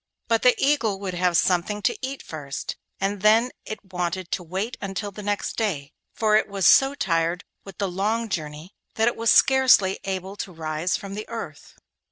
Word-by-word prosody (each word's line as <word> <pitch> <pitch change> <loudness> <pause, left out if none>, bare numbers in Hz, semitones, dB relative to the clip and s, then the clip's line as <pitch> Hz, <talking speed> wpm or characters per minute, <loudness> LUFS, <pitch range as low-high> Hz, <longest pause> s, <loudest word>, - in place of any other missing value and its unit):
But 230 -1 +2
the 250 - +5
eagle 235 -9 +1
would 195 -2 -4
have 175 -1 +2
something 190 +5 +1
to - - +2
eat 270 +1 -4
first, 145 -3 -6 0.2
and 195 0 -1
then 225 +4 +4 0.2
it 200 -3 -8
wanted 180 0 -3
to - - -1
wait 190 +8 -4
until 200 +1 -4
the 210 - -9
next 205 0 -2
day, 170 -11 -2 0.2
for 215 -1 +2
it 215 - +3
was 200 -2 -2
so 270 +1 +6
tired 170 - 0 0.2
with 195 - -11
the 200 - -1
long 210 +5 -1
journey 155 -1 -5 0.2
that 225 +1 +2
it 240 - +1
was 230 0 0
scarcely 250 -8 +5
able 190 0 -4
to 190 - -5
rise 160 +1 -2
from 195 -1 -8
the 215 +1 -6
earth. 225 -10 -8
195 Hz, 190 wpm, -24 LUFS, 180-220 Hz, 0.2 s, so